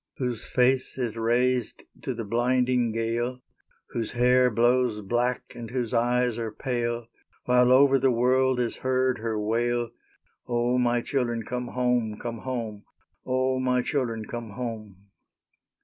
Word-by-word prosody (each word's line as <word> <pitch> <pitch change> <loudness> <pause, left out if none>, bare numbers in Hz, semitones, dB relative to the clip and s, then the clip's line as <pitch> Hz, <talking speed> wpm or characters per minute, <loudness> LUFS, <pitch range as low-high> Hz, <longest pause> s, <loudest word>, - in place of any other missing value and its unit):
Whose 125 -4 -3
face 130 +1 +1
is 120 -4 -2
raised 120 +2 0 0.2
to 130 - -3
the 115 -1 -4
blinding 125 +1 +1
gale; 120 +3 -2 0.5
Whose 115 -2 -3
hair 125 +1 +4
blows 120 -1 +2
black 120 +4 -1
and 120 -2 -8
whose 125 -2 -2
eyes 120 0 +1
are 115 -2 -3
pale, 120 -1 -2 0.4
While 125 0 +4
over 135 +1 +6
the 135 +1 +3
world 130 +1 +2
is 120 -2 -1
heard 130 -1 +1
her 110 -1 -2
wail, 120 +2 0 0.6
"O, 120 +1 +1
my 120 -1 +2
children, 120 -3 -1
come 125 +2 -4
home, 125 -4 0
come 115 0 -5
home! 115 -5 -4 0.4
O, 130 0 +1
my 125 -1 +1
children, 115 -7 -2
come 120 -1 -6
home!" 105 -5 -7
120 Hz, 140 wpm, -26 LUFS, 115-125 Hz, 0.6 s, over